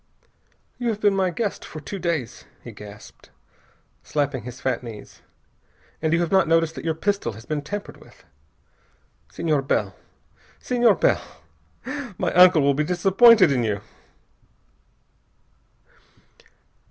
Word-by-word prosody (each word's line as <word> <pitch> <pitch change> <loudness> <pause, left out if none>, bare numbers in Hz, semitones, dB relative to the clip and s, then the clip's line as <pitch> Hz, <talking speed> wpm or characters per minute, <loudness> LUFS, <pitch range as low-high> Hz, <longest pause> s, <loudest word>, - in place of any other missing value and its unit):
"You 245 - -2
have 215 -2 -2
been 205 -2 +2
my 190 -1 +1
guest 200 +4 -3
for 155 - -9
two 195 +6 -7
days," 165 - -3 0.2
he - - -9
gasped, 105 0 -13 0.7
slapping 145 -4 -2
his 125 0 -8
fat 130 -3 -1
knees, 115 -4 -11 0.8
"and 160 0 0
you 170 +1 +2
have 170 - -2
not 190 -3 +4
noticed 165 0 +2
that - - -8
your 160 -1 -1
pistol 195 - -1
his 110 +3 -12
been 155 -1 -3
tampered 205 +8 -7
with! - - -20 1.1
Senhor 155 -4 0
Bell! 135 - -1 0.6
Senhor 240 -4 +2
Bell! - - +2 1.0
My - - -1
uncle 180 -4 +6
will 140 0 +3
be 150 +3 0
disappointed 190 +3 +5
in 125 -3 +1
you!" 105 -3 -2
165 Hz, 130 wpm, -23 LUFS, 135-195 Hz, 1.1 s, uncle